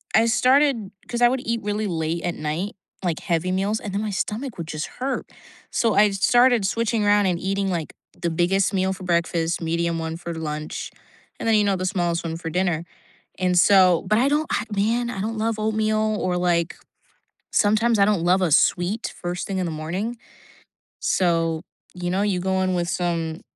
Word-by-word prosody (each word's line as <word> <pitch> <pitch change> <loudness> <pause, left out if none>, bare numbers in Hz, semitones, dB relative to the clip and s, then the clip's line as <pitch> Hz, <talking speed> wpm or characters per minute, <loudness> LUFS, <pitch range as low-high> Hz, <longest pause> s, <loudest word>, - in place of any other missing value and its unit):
I 225 - +5
started 255 -3 +3 0.2
'cause 240 0 -3
I 240 - +7
would 260 0 -1
eat 230 0 -1
really 210 +1 -1
late 165 -1 -2
at 175 - -2
night, 155 +7 -3 0.3
like, 170 -4 -1
heavy 170 +1 0
meals, 200 +4 0
and 205 - -6
then 200 - -1
my 215 - -2
stomach 220 +5 -3
would 165 -2 -5
just 155 -1 -4
hurt, 270 +2 -3 0.4
so 230 -2 +1
I 205 0 +5
started 240 +3 +4
switching 230 0 0
around 205 -1 +4
and 175 -2 0
eating, 195 +1 -1
like, 170 -4 -3 0.3
the 170 - 0
biggest 180 +4 +1
meal 190 0 +1
for 190 0 -10
breakfast, 170 -1 0
medium 170 0 -1
one 160 0 -4
for 170 0 -6
lunch, 155 -1 -5 0.5
and - - -3
then, 225 - +4
you 210 - +4
know, 200 -2 +1
the 185 - -3
smallest 175 -3 0
one 165 -1 -3
for 165 -1 -5
dinner, 175 -1 0 0.5
and 180 -1 +1
so 185 -2 +5
but 215 +3 +3
I 260 - +3
don't 300 +2 +1
ugh 210 - -6
man, 230 +4 +1
I 195 -5 -4
don't 220 +3 -2
I - - 0
love 225 -1 -1
oatmeal, 215 0 +1
or, 180 -1 0
like, 175 -1 +1 0.8
sometimes 220 +2 +3
I - - +6
don't 200 -5 +1
love 180 +2 +3
a 175 -4 +1
sweet 180 +9 +2
first 175 0 -3
thing 195 -1 -2
in 185 - -1
the 170 - -3
morning, 180 +10 -4 0.8
so, 165 -3 +1 0.3
you 175 -1 -3
know, 190 +2 +1
you 200 -3 +1
go 190 +1 0
in 185 -1 +1
with 175 -1 -1
some 170 -3 -2
190 Hz, 200 wpm, -23 LUFS, 170-215 Hz, 0.8 s, I